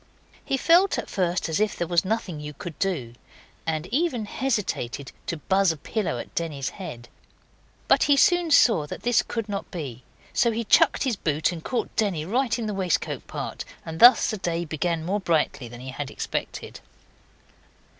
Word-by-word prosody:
He 270 - 0
felt 345 +7 +4
at - - -5
first 180 -2 0
as 160 +2 -1
if 215 -1 +1
there 175 - -2
was 170 0 +2
nothing 190 -5 -2
you 150 0 -7
could 165 +2 -8
do, 150 -12 -1 0.5
and 160 0 -1
even 270 -7 +1
hesitated 200 - -2 0.2
to 170 - -2
buzz 190 +3 +2
a 160 - -5
pillow 185 - -2
at - - -8
Denny's 150 -5 -2
head. 120 -11 -8 0.8
But - - +5
he 285 -1 +4
soon 350 -1 +4
saw 225 - +5
that - - -7
this 240 -1 +4
could 230 -2 -4
not 200 -1 -4
be. 135 - -6 0.3
So 235 - +3
he 230 +1 -1
chucked 210 - +4
his 250 -6 0
boot 155 -2 0
and 165 -2 -7
caught 250 - -3
Denny 195 -8 0
right 235 +4 +1
in 235 - -3
the 210 - -2
waistcoat 185 -3 -1
part, - - -5 0.2
and 160 0 -6
thus 245 +3 +8
the 215 - -3
day 170 -2 -2
began 160 +1 -2
more 200 +4 0
brightly 160 -8 0
than 120 +1 -10
he 130 - -7
had 135 +1 -5
expected. - - -5
180 Hz, 185 wpm, -25 LUFS, 155-225 Hz, 0.8 s, thus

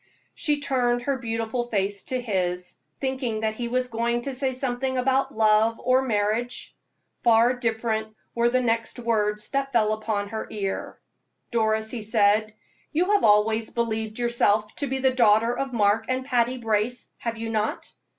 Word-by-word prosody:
She 295 -2 0
turned 245 -3 +1
her 275 0 -1
beautiful 230 +1 -2
face 200 -2 -1
to 255 - -2
his, 180 -6 -2 0.2
thinking 260 -5 -2
that 220 -1 0
he 235 +2 -4
was 250 +1 0
going 235 0 -1
to 275 - -4
say 260 +1 0
something 260 0 -2
about 265 0 +1
love 220 +1 +3
or 255 +1 +3
marriage. 230 0 -1 0.5
Far 235 +1 +5
different 225 -2 -1 0.3
were 235 0 +2
the 255 +1 +2
next 230 -1 0
words 210 -3 0
that 275 -1 -1
fell 215 -3 +2
upon 215 -2 -2
her 220 +1 -5
ear. 200 -3 -4 0.5
"Doris," 220 -1 +1
he 240 - -4
said, 215 0 +2 0.4
"you 355 +6 +1
have 415 - +3
always 220 +1 +3
believed 220 -2 -2
yourself 220 -3 +2
to 285 - 0
be 265 +1 -1
the 265 0 +2
daughter 230 -1 +4
of 275 -1 -3
Mark 215 -1 +2
and 255 0 -1
Patty 250 -1 +1
Brace, 225 +1 -1
have 230 -1 -3
you 225 0 -4
not?" 215 -1 -2
230 Hz, 165 wpm, -25 LUFS, 215-255 Hz, 0.5 s, Far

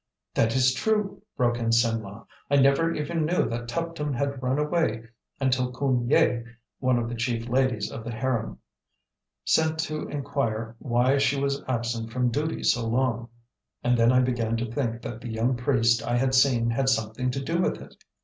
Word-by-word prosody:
"That 115 +1 +2
is 130 0 +4
true!" 210 - -1 0.2
broke 120 -1 +1
in 115 -1 -1
Simlah; 115 -3 0 0.2
"I 140 - +3
never 140 +4 +4
even 160 +1 -2
knew 170 +4 +1
that 120 +1 -4
Tuptim 160 0 -3
had 140 +1 -2
run 130 +1 0
away 150 -7 0 0.4
until 130 -2 +1
Khoon 125 -2 0
Yai 120 -4 +3 0.4
(one 130 -2 +2
of 120 -1 -1
the 120 - -5
chief 115 0 -2
ladies 125 -3 0
of 115 - -7
the 115 - -6
harem) 115 0 -2 0.9
sent 160 0 +2
to 155 -1 -4
inquire 115 -6 -3
why 130 +2 +2
she 140 0 +2
was 140 0 -1
absent 115 -2 -2
from 125 0 0
duty 150 +6 -2
so 115 -1 +2
long, 120 -1 0 0.5
and 125 0 +3
then 115 0 +4
I 130 0 +4
began 120 -3 0
to 115 0 -3
think 120 -2 -2
that 115 0 -6
the 120 - -6
young 115 +3 0
priest 120 -2 +2
I 120 +1 0
had 130 +1 +1
seen 125 -3 +3
had 135 +3 +1
something 110 +1 0
to 135 - -2
do 170 +5 0
with - - 0
it. - - -12
125 Hz, 185 wpm, -26 LUFS, 115-140 Hz, 0.9 s, is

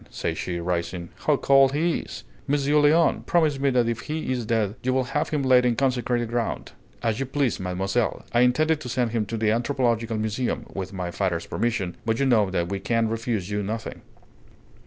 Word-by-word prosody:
said - - -3
she, 90 -1 -3
rising. 85 0 -3 0.2
"How 150 -2 +4
cold 135 0 +4
he 165 +3 +1
is! - - -9 0.2
Monsieur 145 +1 +2
Léon, 155 +3 +3
promise 155 -5 +2
me 140 0 +2
that 125 -3 +2
if 115 -1 -1
he 155 -3 -4
is 120 -4 -2
dead 110 -3 +1
you 130 +1 0
will 130 - +2
have 140 +4 -2
him 150 -3 -1
laid 130 -1 +5
in 120 -1 +2
consecrated 125 -2 0
ground!" 115 -1 -2 0.3
"As 115 0 0
you 135 - -2
please, 135 -3 0
mademoiselle. 95 +5 -1
I 120 - +3
intended 155 +6 +3
to 125 - -6
send 120 -2 0
him 110 -3 -1
to 115 - -3
the 110 -1 +2
anthropological 115 -2 0
museum, 110 +2 -2
with 95 -1 -5
my 90 -3 -4
father's 85 -3 -1
permission; 110 -7 -2
but 115 0 0
you 140 - +2
know 110 -7 +3
that 85 -2 -1
we 100 0 -2
can 115 +1 0
refuse 115 -4 -2
you 105 0 -1
nothing." 110 +3 -5
120 Hz, 200 wpm, -25 LUFS, 105-135 Hz, 0.3 s, laid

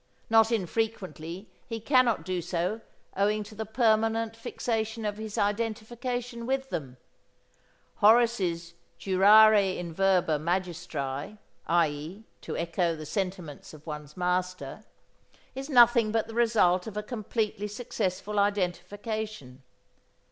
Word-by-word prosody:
Not 225 0 +5
infrequently 190 -4 -3 0.2
he 230 -1 -4
cannot 255 -1 +2
do 185 -1 -2
so 180 +5 -2 0.3
owing 210 +2 +1
to 210 - -12
the 220 0 -5
permanent 225 0 +1
fixation 225 -1 -3
of 205 0 -2
his 220 0 -6
identification 235 +3 -2
with 265 0 -1
them. 130 -5 -5 1.0
Horace's 205 -7 +3 0.2
"Jurare 200 +1 +5
in 170 -2 -5
verba 180 -4 +2
magistri" 170 -2 -3 0.3
(i.e., 165 +4 0 0.2
to - - -5
echo 170 0 0
the 155 -1 -8
sentiments 180 -4 -5
of 155 - -16
one's 150 -1 -8
master) 180 0 -2 0.7
is 270 +2 -6
nothing 240 -4 +6
but 225 0 +1
the 225 - -9
result 220 -6 +3
of 210 -1 -7
a 210 - -2
completely 215 -2 -3
successful 210 -2 -3
identification. 200 - -2
205 Hz, 115 wpm, -28 LUFS, 175-225 Hz, 1.0 s, nothing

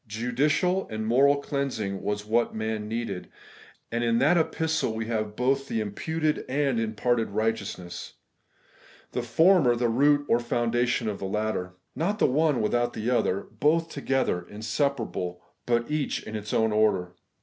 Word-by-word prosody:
Judicial 145 - +1
and 110 0 -3
moral 135 +5 +5
cleansing 135 -9 -3
was 105 0 -2
what 115 +2 +1
man 110 -1 -3
needed; 115 -4 -4 0.6
and 120 +1 -1
in 115 -1 +2
that 145 +8 +4
epistle 160 -7 0
we 110 0 -3
have 110 -2 -2
both 135 +3 +1
the 115 - -1
imputed 155 +9 -1
and 135 -3 +1
imparted 115 +1 0
righteousness; 110 -5 -3 1.0
the 125 - -1
former 140 +2 +4
the 120 0 +1
root 145 +4 +3
or 115 - +3
foundation 120 0 0
of 105 -2 -3
the - - -4
latter. 95 -2 -2 0.2
Not 200 +6 0
the - - +3
one 145 -2 +2
without 120 +3 +1
the 110 +3 -2
other; 110 -5 +1 0.2
both 165 +4 +2
together, 135 -10 0
inseparable; 110 -5 -2 0.2
but 120 +3 +1
each 150 -2 -1
in 110 - -7
its 105 -1 -5
own 110 -1 +2
order. 105 -4 +2
120 Hz, 150 wpm, -27 LUFS, 110-140 Hz, 1.0 s, moral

